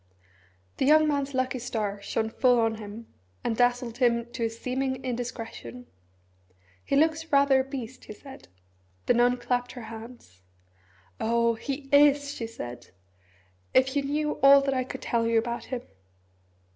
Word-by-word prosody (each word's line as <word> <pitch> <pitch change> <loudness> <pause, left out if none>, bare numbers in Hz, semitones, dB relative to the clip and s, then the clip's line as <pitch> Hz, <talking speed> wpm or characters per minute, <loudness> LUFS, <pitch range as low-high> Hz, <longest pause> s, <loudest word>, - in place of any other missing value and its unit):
The - - +1
young 310 +1 +6
man's 280 -2 -1
lucky 255 0 -1
star 210 -4 -3
shone 220 +2 -2
full 250 -1 +3
on 225 -1 +1
him, 215 +2 -10 0.3
and 225 - -1
dazzled 245 0 +1
him 235 -2 +2
to 235 - -2
a - - 0
seeming 260 +3 -3
indiscretion. 230 - -6 1.0
"He - - -1
looks 320 +2 +1
rather 280 -1 +5
a - - +1
beast," 260 -2 -7
he - - -8
said. 270 +5 -13 0.6
The - - +4
nun 245 +1 +3
clapped 245 0 -2
her 245 - -8
hands. 225 - -12 0.8
"Oh 235 +1 +2
he 270 +4 -5
is!" 285 0 +5
she 230 - -5
said. 120 - -8 0.9
"If 260 +1 +4
you 285 - +2
knew 300 +2 -2
all 275 0 +8
that 275 0 0
I 255 -1 -1
could - - -8
tell 230 -1 0
you 230 0 +2
about 235 +1 -2
him!" 250 -2 -5
245 Hz, 160 wpm, -27 LUFS, 230-275 Hz, 1.0 s, all